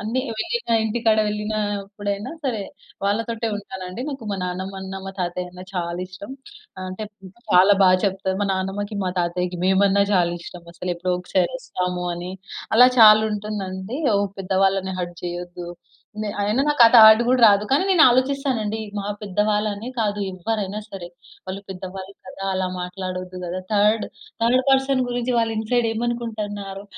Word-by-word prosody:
అన్నీ 230 +5 -1 0.2
వెళ్ళిన 345 - 0
ఇంటికాడ 220 0 +1
వెళ్ళినప్పుడైనా 205 +1 -3
సరే, 225 -6 -1 0.4
వాళ్ళతోటే 225 +3 -1
ఉంటానండి. 190 +2 -7
నాకు 265 -6 -7
మా - - -2
నాన్నమ్మ 190 +2 -4
అన్న, 190 0 -7
మా 195 - -6
తాతయ్య 180 0 -3
అన్న 180 0 -10
చాలా 170 0 -2
ఇష్టం. 200 +7 -9 0.6
అంటే 185 +4 -5 0.5
చాలా 190 +2 +6
బా 185 - +7
చెప్తారు. 190 -1 -1
మా - - +1
నానమ్మకి, 200 +2 -3
మా 180 - 0
తాతయ్యకి 180 +1 -2
మేమన్నా 195 +1 +4
చాలా 175 -2 +3
ఇష్టం 175 -1 -10
అసలు. 180 +1 -4
ఎప్పుడో 180 +1 -1
ఒకసారి 180 0 0
ఒస్తాము 180 -3 -3
అని, 175 +2 -6 0.4
అలా 250 +2 +8
చాలు 215 -1 +9
ఉంటుందండి. 205 +2 -4 0.2
ఓ - - +4 0.2
పెద్ద 190 0 -4
వాళ్ళని 190 -1 0
హర్ట్ 175 -1 -5
చేయొద్దు. 175 0 -6 0.6
నె 210 - -3
అయినా 210 +6 +1
నాకు 295 -5 +6
థాట్ 220 0 +9
గూడా 255 0 +3
రాదు. 205 0 +4
కానీ, 280 +6 +4
నేను 355 -5 +6
ఆలోచిస్తానండి. 255 -4 0 0.2
మా 200 - -4 0.2
పెద్దవాళ్ళు 210 +2 0
అనే 220 +5 -7
కాదు. 210 -2 0
ఎవ్వరైనా 205 +2 -3
సరే. 180 -3 -7 0.4
వాళ్ళు 190 +1 -5
పెద్దవాళ్ళు 190 +1 -7
కదా! 195 +1 -8
అలా 185 0 0
మాట్లాడొద్దు 185 0 -5
కదా! 175 +2 -4
థర్డ్ 210 +1 +3 0.4
థర్డ్ 250 +3 +3
పర్సన్ 270 -1 +3
గురించి 245 0 -1
వాళ్ళు 225 -1 +1
ఇన్సైడ్ 230 +1 +1
ఏమనుకుంటున్నారు, 215 -4 -4
200 Hz, 150 wpm, -22 LUFS, 185-225 Hz, 0.6 s, చాలు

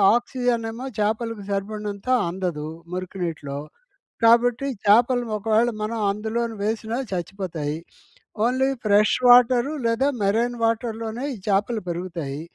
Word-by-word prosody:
Oxygen 240 -1 0
ఏమో 245 +4 -7
చాపలకు 220 0 -1
సరిపడినంత 205 +1 -4 0.2
అందదు 170 -4 -3 0.3
మురికి 185 +1 -5
నీటిలో 145 -4 -4 0.7
కాబట్టి, 240 +3 +4 0.2
చాపలు 240 +4 +5
ఒకవేళ 220 +3 +2
మనం 225 +1 -2
అందులోను 225 +2 -2
వేసినా 220 +2 -2
చచ్చిపోతాయి. 170 -4 -3 0.7
ఓన్లీ 260 +2 +2 0.2
ఫ్రెష్ 210 0 +4
వాటరు 245 +2 +6
లేదా 230 +4 +2
మెరైన్ 230 +5 +1
వాటర్‌లోనే 225 +1 -1
ఈ - - -10
చాపలు 205 +3 +1
పెరుగుతాయి. 165 -5 -4
220 Hz, 110 wpm, -23 LUFS, 195-235 Hz, 0.7 s, వాటరు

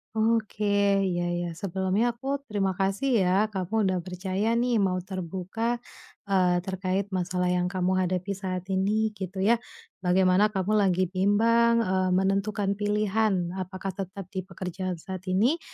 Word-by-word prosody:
Oke. 220 -1 +1 0.4
Ya 175 -2 0
ya, 175 0 -2
sebelumnya 190 +6 -1
aku 275 +3 -2
terima 200 -4 0
kasih 195 +7 -1 0.2
ya, 185 +2 +3
kamu 200 +3 -1
udah 185 -2 +1
percaya 190 +5 -2
nih 240 -1 +2
mau 190 -2 +2
terbuka, 190 +6 -3 0.4
eee, 185 -3 +2
terkait 190 +1 -2
masalah 180 -1 0
yang 180 0 +1
kamu 185 0 0 0.2
hadapi 185 +2 -2
saat 185 -2 -3
ini, 210 +3 +1
gitu 190 -2 -5
ya. 230 +3 +4 0.4
Bagaimana 185 +2 +4
kamu 210 +1 0
lagi 185 -2 +2
bimbang, 230 +5 +3
eee, 185 -2 +1
menentukan 195 +1 +1
pilihan 205 -3 +1
apakah 190 +1 -4
tetap 190 0 -6
di 190 - -3
pekerjaan 185 0 -4
saat 185 +2 -8
ini 225 - +2
190 Hz, 140 wpm, -27 LUFS, 185-210 Hz, 0.4 s, ya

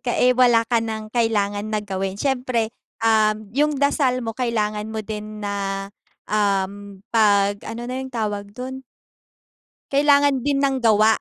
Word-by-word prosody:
ka, 240 - -2
eh 250 0 +4
wala 240 -2 +4
ka 230 0 +1
ng 220 -1 -5
kailangan 210 -3 0
na 215 -1 -2
gawin 195 -1 -3
siyempre, 250 -3 -1 0.3
uhm, 215 -1 +2
yung 295 +2 +1
dasal 265 -3 +1
mo 225 - -3
kailangan 215 -3 -1
mo 220 -1 -5
din 210 0 -6
na 195 -1 -3 0.4
uhm, 200 -1 -1
'pag 205 -2 +3
ano 230 +2 -5
na 255 +2 -4
yung 265 - -6
tawag 210 -3 -3
dun 260 +1 -6 1.1
kailangan 285 -1 +4
din 280 +3 0
ng 270 -1 +2
gawa. 220 -1 +4
220 Hz, 150 wpm, -22 LUFS, 205-250 Hz, 1.1 s, eh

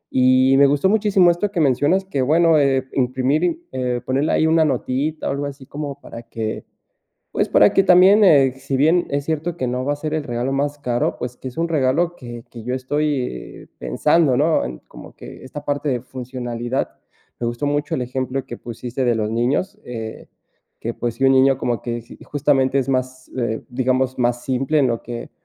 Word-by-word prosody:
y 130 +1 +5
me 140 - +6
gustó 145 +7 +2
muchísimo 200 -4 +4
esto 195 +4 -1
que 180 - -2
mencionas 145 +8 +2
que 145 -8 -2
bueno, 160 +3 +4
eh, 135 -2 +1
imprimir, 135 - 0
eh, 125 -1 -1
ponerle 135 +4 0
ahí 160 - +3
una 160 0 +4
notita, 140 +3 -1
algo 140 +1 -2
así 135 -1 -10
como 145 -1 -6
para 115 - -9
que 110 -1 -5 0.7
pues, - - 0
para 105 - +5
que 195 - +4
también, 190 +3 +6
eh, 140 -7 +5
si 135 0 -3
bien 160 +6 +3
es 140 0 -1
cierto 160 +2 -2
que 130 - -2
no 125 +1 -2
va 145 - +1
a - - -10
ser 155 +1 -5
el 155 -2 -2
regalo 120 +2 -2
más 145 +1 -1
caro, 120 -4 -1
pues, 125 0 -5
que 130 - -6
es 125 - -12
un 170 - 0
regalo 165 +3 +1
que 120 -2 -9
que 115 -2 -10
yo 125 +2 -2
estoy 140 0 -3
pensando, 150 -4 +2
¿no? 155 +4 +2
En 60 0 -6
como - - -13
que - - -11
esta 145 +2 -8
parte 145 +1 -2
de 125 -2 -1
funcionalidad, 125 -1 -4 0.5
me 120 - -1
gustó 120 +4 -4
mucho 145 +2 -1
el 130 - -2
ejemplo 130 +1 -3
que 120 - -8
pusiste 120 +2 -5
de 120 - +3
los 105 -1 -1
niños, 135 - -1
eh, 110 -2 -7 0.5
que 115 - -3
pues, 120 -2 -3
si 135 - -1
un 135 - +6
niño 135 0 +4
como 120 -3 -1
que 120 -1 -4 0.2
justamente 140 -2 +1
es 135 - -1
más, 130 0 -3
eh, 115 -2 -2
digamos, 130 +1 0
más 120 -1 0
simple 135 +4 0
en 135 - +3
lo 115 -1 -1
que 120 0 -7
135 Hz, 200 wpm, -20 LUFS, 125-150 Hz, 0.7 s, me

